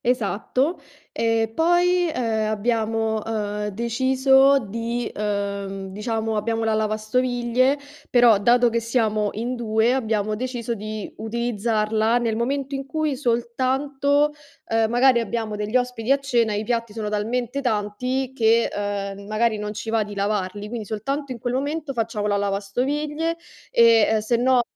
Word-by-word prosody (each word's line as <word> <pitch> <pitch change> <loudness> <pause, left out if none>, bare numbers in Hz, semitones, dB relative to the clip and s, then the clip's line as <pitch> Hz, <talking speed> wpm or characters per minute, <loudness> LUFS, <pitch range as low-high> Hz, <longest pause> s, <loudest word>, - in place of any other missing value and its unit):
Esatto. 250 - 0 0.3
E 225 -1 +1
poi, 350 +3 +3
ehm, 220 -5 -1
abbiamo, 220 0 0
ehm, 210 -2 -3
deciso 260 +5 +3
di, 230 +2 -3
ehm, 200 -2 -3
diciamo, 220 +2 -2
abbiamo 225 +2 -1
la 220 0 +1
lavastoviglie, 240 +4 +1 0.3
però 240 -4 +5
dato 240 +3 +4
che 235 0 0
siamo 220 -3 0
in 240 +4 -3
2, 225 0 +1
abbiamo 215 -4 0
deciso 240 0 -3
di 215 -1 -6
utilizzarla 220 0 0
nel 230 -2 0
momento 275 +4 -2
in 270 0 -5
cui 310 -1 -1
soltanto, 270 +4 +1 0.4
ehm, 225 -1 +2
magari 245 +1 +4
abbiamo 225 -1 -3
degli 210 +3 -4
ospiti 250 -1 -2
a 275 - +6
cena, 240 -6 +1
i 210 - -1
piatti 230 -1 -2
sono 220 -1 -4
talmente 235 +5 -2
tanti 250 +3 -1
che, 230 -2 +3
ehm, 200 -1 -4
magari 215 +1 +1
non 210 0 -4
ci 220 +1 -6
va 225 -1 +2
di 205 0 -8
lavarli, 200 0 -2
quindi 225 -1 -5
soltanto 275 +7 -3
in 250 - -4
quel 245 +2 -2
momento 290 +2 -2
facciamo 225 -3 -2
la 205 -1 +1
lavastoviglie, 275 +12 -1 0.3
ehm, 230 -2 +5
e - - -1
sennò 245 +3 +3
230 Hz, 145 wpm, -23 LUFS, 215-255 Hz, 0.4 s, a